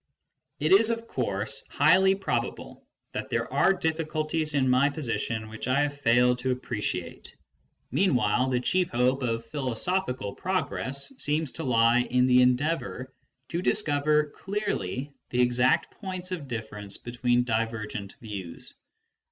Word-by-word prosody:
It 155 - +1
is, 210 +4 +6
of 230 0 -2
course, 110 - -1
highly 185 +6 +5
probable 195 0 -4 0.2
that - - -5
there - - -2
are - - +4
difficulties 155 -2 -1
in 135 -2 +3
my 130 +3 +4
position 115 -6 -3
which 110 +2 -6
I 130 +3 +3
have 145 -1 -1
failed 125 -1 +3
to 130 +1 -2
appreciate; 105 -8 -3 0.6
meanwhile, 125 - +2
the 125 -1 +1
chief 180 +6 +1
hope 125 +3 +1
of 115 -2 -2
philosophical 130 - -2
progress 180 - -2
seems 150 -1 0
to - - -5
lie 115 -1 +4
in 125 +1 +2
the 125 0 +5
endeavour 130 0 0 0.4
to 170 - -2
dis 210 +3 +2
cover 150 0 +1
clearly 150 - -3 0.2
the 125 0 +2
exact 125 +1 +2
points 185 -2 -4
of 165 -6 -4
difference 110 -4 -6
between 120 0 0
divergent 110 -3 -3
views. 100 -7 -7
130 Hz, 135 wpm, -27 LUFS, 115-155 Hz, 0.6 s, is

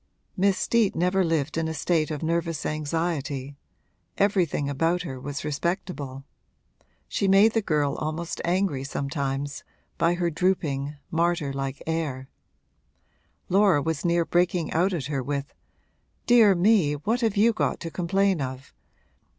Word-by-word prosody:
Miss 195 0 +2
Steet 230 -4 +2
never 180 +3 +2
lived 160 -2 0
in 165 - -1
a 160 - -3
state 160 0 +1
of 155 0 -4
nervous 165 -1 -1
anxiety 150 -3 -2 0.6
everything 185 -8 +1
about 165 +5 0
her 130 -6 -6
was 145 +1 -5
respectable. 145 -3 -3 0.8
She 200 - -1
made 200 +3 +5
the 225 - +2
girl 150 -7 0
almost 155 +2 -4
angry 175 -6 0
sometimes, 140 0 -3 0.4
by 170 +2 +3
her 175 -1 0
drooping, 150 -5 -1 0.2
martyr 165 -3 0
like 135 0 -4
air: 150 -5 -2 1.2
Laura 195 -4 +4
was 160 0 -2
near 170 -1 +2
breaking 175 -1 +1
out 180 +5 +2
at 170 -7 -2
her 140 -2 -2
with, 140 +2 -4 0.7
'Dear 225 -5 +6
me, 180 -4 +3
what 215 - -1
have 220 -3 0
you 225 +3 +5
got - - -1
to 165 - -5
complain 190 0 +1
of? 130 0 -6
165 Hz, 140 wpm, -25 LUFS, 145-185 Hz, 1.2 s, Dear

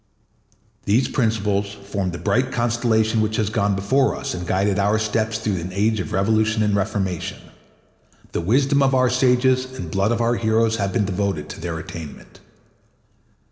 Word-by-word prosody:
These 115 +6 +2
principles 105 -5 0
form 100 -1 -4
the 85 - -5
bright 130 +7 0
constellation 115 -2 +1
which 110 0 0
has 110 -1 0
gone 100 -1 +1
before 130 +8 +1
us - - -4
and 90 -1 -5
guided 100 +2 +1
our 100 +2 +2
steps 110 0 -1
through 105 -3 -2
an 90 - -5
age 105 +3 +1
of 95 - -4
revolution 110 +3 +1
and 105 -1 +1
reformation. 95 -3 -2 0.9
The - - -2
wisdom 135 - +2
of 135 -1 +3
our 130 -1 +3
sages 130 0 +3
and 85 -3 -6
blood 100 +4 +1
of 120 - 0
our 120 0 +1
heroes 110 0 +1
have 100 -2 -1
been 110 -2 +1
devoted 95 -5 -2
to - - -8
their 85 -1 -3
attainment. 80 -2 -9
110 Hz, 170 wpm, -22 LUFS, 100-115 Hz, 0.9 s, of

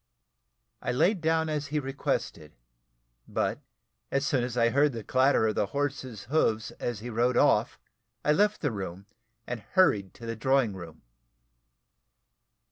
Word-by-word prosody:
I - - -1
lay 175 - +3
down 160 -3 0
as 150 -2 -2
he 150 +1 -2
requested; 135 - -3 0.7
but - - -1 0.5
as 135 +1 0
soon 130 -4 +1
as 125 0 -4
I 115 -1 +4
heard 140 +3 +3
the 115 -2 -6
clatter 130 -1 +3
of 110 - +1
the 100 - 0
horses 135 -5 -3
hoofs, 110 -7 0
as 120 -4 -3
he 120 +2 -6
rode 120 +3 +1
off, - - +3 0.5
I 150 - +4
left 205 +6 +2
the 145 - 0
room, 95 -2 -6 0.4
and 125 -1 -4
hurried 105 - +2
to 115 - -10
the 115 0 -3
drawing 130 -2 +2
room. 85 -4 -10
125 Hz, 150 wpm, -28 LUFS, 110-145 Hz, 0.7 s, I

